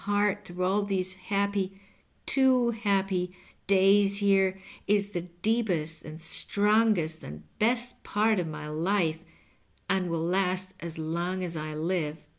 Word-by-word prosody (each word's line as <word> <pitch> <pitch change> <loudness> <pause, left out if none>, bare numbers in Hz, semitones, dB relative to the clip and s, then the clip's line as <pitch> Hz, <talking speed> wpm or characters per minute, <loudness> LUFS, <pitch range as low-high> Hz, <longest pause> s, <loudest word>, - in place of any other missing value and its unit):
215 205 0 +2
heart 205 - -20
through 180 +1 -3
all 195 +3 +2
these 190 -2 -1
happy 195 0 -2 0.2
— - - -40
too 255 -3 +4
happy 195 -4 -1
— - - -32
days 195 +1 +4
here 195 -2 +2 0.3
is 205 0 +2
the 175 -3 -2
deepest 175 -3 -1
and 155 +1 -9
strongest 200 -1 +2
and 75 +1 -9 0.2
best 245 +2 +1
part 215 0 +1
of 175 - -2
my 150 -1 -6
life, 165 +1 0 0.6
and 185 -2 0
■will 165 0 -1
last 185 0 +1
as 170 -2 -6
long 170 +4 -2
as 170 -2 -4
I 155 0 -5
live. 160 -1 -2
190 Hz, 150 wpm, -28 LUFS, 170-205 Hz, 0.6 s, too